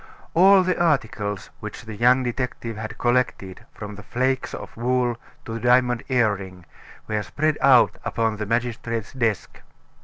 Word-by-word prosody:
All 190 +2 +6
the 180 -1 0
articles 110 - -1
which 105 +3 -8
the 110 - -7
young 125 +4 +4
detective 120 -2 -3
had 110 +1 -7
collected, 120 -6 -1
from 105 -1 -8
the 105 - -10
flakes 130 +4 -1
of - - -9
wool 125 0 0 0.3
to 115 - -6
the 115 - -4
diamond 125 0 +3
earring, 100 -7 0 0.4
were 105 -1 -1
spread 155 +7 -1
out 135 -4 +5
upon 110 -2 -1
the 105 -1 -4
magistrate's 115 -1 -2
desk. 115 -6 -2
120 Hz, 150 wpm, -23 LUFS, 105-130 Hz, 0.4 s, All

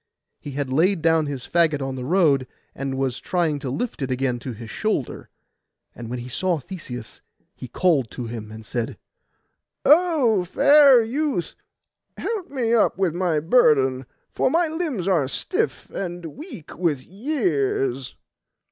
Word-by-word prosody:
He 145 - -8
had 135 -2 -2
laid 170 +3 +2
down 160 -2 +3
his 135 -3 -5
faggot 155 -5 +1
in 135 - -4
the 130 -1 -5
road, 145 -4 +3 0.3
and 135 0 -4
was 130 -2 -1
trying 165 -5 0
to 135 - -4
lift 225 - -3
it 135 - -2
again 125 -1 -1
to 125 +2 -6
his 115 0 -9
shoulder. 215 - -2 0.6
And 120 -1 -8
when 125 - -3
he 120 0 -7
saw 175 +7 0
Theseus, 130 - -8 0.3
he 125 - -9
called 140 -3 +1
to 120 - -6
him, 115 -2 -7
and 110 0 -10
said— 115 +2 -3 0.9
'O 295 - +4
fair 280 - +6
youth, 265 - -2 0.6
help 430 -6 -3
me 245 -4 0
up 225 -5 +3
with 190 -4 +1
my 175 -3 +1
burden, 135 - +3 0.3
for - - +2
my 335 +4 +2
limbs 310 - -3
are 165 -8 +2
stiff 130 - -2
and 175 -4 -5
weak 270 - -10
with 155 -7 -1
years. 155 - -1
160 Hz, 155 wpm, -23 LUFS, 130-215 Hz, 0.9 s, fair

